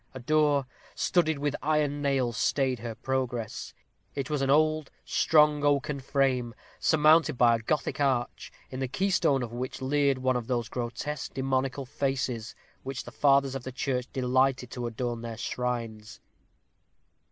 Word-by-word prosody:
A - - -5
door, 145 +1 +2 0.3
studded 160 -4 +1
with 145 0 -1
iron 150 -1 +1
nails, 135 -5 0
stayed 130 +1 +1
her 115 0 -6
progress; 125 -3 -3 0.4
it 140 0 -3
was 150 -2 0
an 135 - 0
old, 155 +1 +3 0.2
strong 150 -2 +3
oaken 145 0 +1
frame, 130 -3 0 0.2
surmounted 155 -2 +4
by 120 -1 +5
a - - -2
Gothic 145 +8 -2
arch, 130 -4 -1 0.2
in 130 - -5
the 135 - -1
keystone 145 -4 +1
of 120 -1 -6
which 125 +2 -4
leered 140 0 +1
one 130 0 +1
of 120 -2 -3
those 120 -3 -1
grotesque 125 +4 -4
demoniacal 135 +1 -1
faces 130 -4 -2 0.2
with - - -36
which 135 -1 -4
the 120 - -10
fathers 140 0 +3
of 135 - -4
the 130 - -6
church 125 -1 -2
delighted 130 0 +1
to 120 -1 -4
adorn 120 0 -3
their 115 -1 -6
shrines. 115 -3 -4
130 Hz, 155 wpm, -28 LUFS, 125-145 Hz, 0.4 s, by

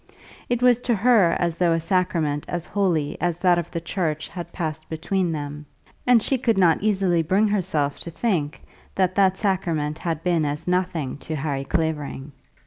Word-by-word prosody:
It 245 0 0
was 245 -1 +5
to 235 - +4
her 205 -5 +4
as 170 -1 -1
though 175 -2 +3
a 165 - +1
sacrament 165 -4 0
as 175 -1 -3
holy 170 -7 -1
as 175 -2 0
that 175 -1 +3
of 170 - -5
the 170 - -3
church 165 -3 -3
had 170 -1 -7
passed 155 -3 -5
between 175 +2 -1
them, 150 -1 -5 0.4
and 240 -3 +5
she 270 - 0
could 230 -4 +1
not 170 -4 +4
easily 190 -5 +2
bring 190 +7 +2
herself 160 -8 0
to - - -6
think 165 -5 -2 0.3
that 185 -1 +2
that 190 -1 +3
sacrament 165 -7 -1
had 165 -2 -3
been 175 -3 +2
as 150 +3 -3
nothing 180 -7 -1
to 160 - -5
Harry 140 -2 -2
Clavering. 150 -3 -2
170 Hz, 180 wpm, -23 LUFS, 155-190 Hz, 0.4 s, was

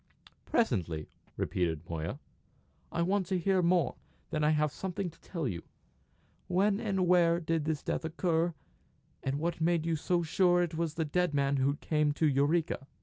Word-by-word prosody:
"Presently," 85 - 0 0.3
repeated 85 -2 -1
Moya. 80 -1 -3 0.7
"I 170 - 0
want 190 +1 +1
to 190 0 0
hear 185 +1 +2
more; 175 0 +2 0.3
then 155 -1 0
I - - +4
may 155 - +4
have 150 -1 +1
something 190 +1 -4
to - - -24
tell 165 -6 -3
you. 85 -6 -3 0.9
When 195 +3 +2
and 195 -5 0
where 170 -1 +4
did 165 -2 -1
this 155 -2 -1
death - - -2
occur, 165 +1 0 0.7
and 135 +1 -1
what 165 +2 -2
made 165 -1 +2
you 165 -1 +1
so 170 +3 0
sure 175 +1 +3
that 175 -2 -1
it - - -4
was 165 -2 -1
the 160 - 0
dead 175 +1 0
man 140 0 +2
who 135 +2 +2
came 150 -1 +1
to 155 +1 +2
Eureka? 145 +1 +1
165 Hz, 180 wpm, -31 LUFS, 145-175 Hz, 0.9 s, I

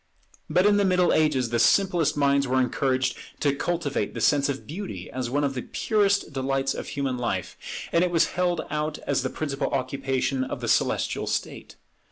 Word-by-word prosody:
But 180 +2 +3
in 205 0 +5
the 205 - +3
Middle 180 -2 +3
Ages 140 -7 +2
the 120 - +1
simplest 175 +1 +3
minds 140 -1 +3
were 130 +1 +2
encouraged 130 0 +1 0.2
to 140 -2 +2
cultivate 165 -2 -2
the - - -3
sense 145 -1 +3
of 135 -1 -4
beauty 190 +6 -6
as 125 -2 -3
one 145 +3 0
of 140 -1 0
the 125 - -3
purest 200 - 0
delights 135 0 0
of - - -6
human 135 -3 -2
life; 120 - -2 0.4
and 170 - +3
it 180 - +1
was 170 -2 +2
held 175 -1 +1
out 150 0 -2
as 140 - +1
the 130 - -2
principal 145 -1 -2
occupation 135 0 -1
of 130 - -5
the - - -4
celestial - - +1
state. - - -4
140 Hz, 190 wpm, -25 LUFS, 130-175 Hz, 0.4 s, in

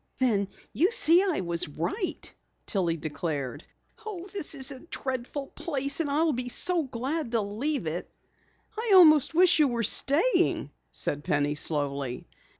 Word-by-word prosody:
"Then 215 -6 +1 0.3
you 350 +6 +3
see 360 -7 +5
I 375 - 0
was 170 -2 -1
right," 170 - -4 0.3
Tillie 175 -5 -1
declared. 145 -4 -4 0.4
"Oh, 390 -4 -7
this 375 -6 -1
is 270 0 +1
a 265 - -8
dreadful 265 -2 -5
place, 280 -3 -2
and 315 -3 -1
I'll 310 +2 +2
be 245 0 -3 0.4
glad 260 +2 -3
to 230 - +2
leave 225 - -2
it." 160 +3 -4 0.7
"I 445 -1 0
almost 310 -4 +6
wish 355 -1 +5
you 300 - +5
were 235 -2 -2
staying," 285 - +3 0.2
said 145 0 -1
Penny 145 0 0
slowly. 140 - -2
260 Hz, 145 wpm, -27 LUFS, -, 0.7 s, almost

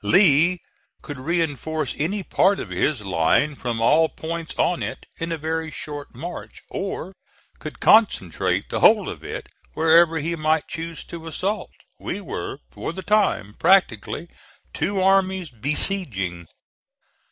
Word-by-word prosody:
Lee 180 -1 +5 0.5
could 145 -3 -7
reinforce 155 -2 -1
any 190 +7 -2
part 190 +4 +2
of - - -6
his 145 -7 0
line 95 - +2
from 120 -4 -3
all 155 +8 +4
points 165 0 -6
of 175 - +1
it - - -5
in 165 0 -3
a 165 - -1
very 160 +1 -2
short 145 -2 -7
march; 175 +1 -8
or 190 -1 -4 0.5
could - - -8
concentrate 205 - +3
the - - -2
whole - - +5
of - - -7
it - - -6 0.3
wherever 165 +1 +5
he 165 +3 -2
might 155 -1 +1
choose 165 -1 -5
to 165 -1 -9
assault. 190 +6 -2 0.3
We 195 - -4
were, 165 -6 -5
for - - -5
the 190 - -7
time, 200 - +1
practically 175 - +2 0.5
two 200 +1 -1
armies 190 -3 +2
besieging. 115 - 0
160 Hz, 140 wpm, -23 LUFS, 145-185 Hz, 0.5 s, Lee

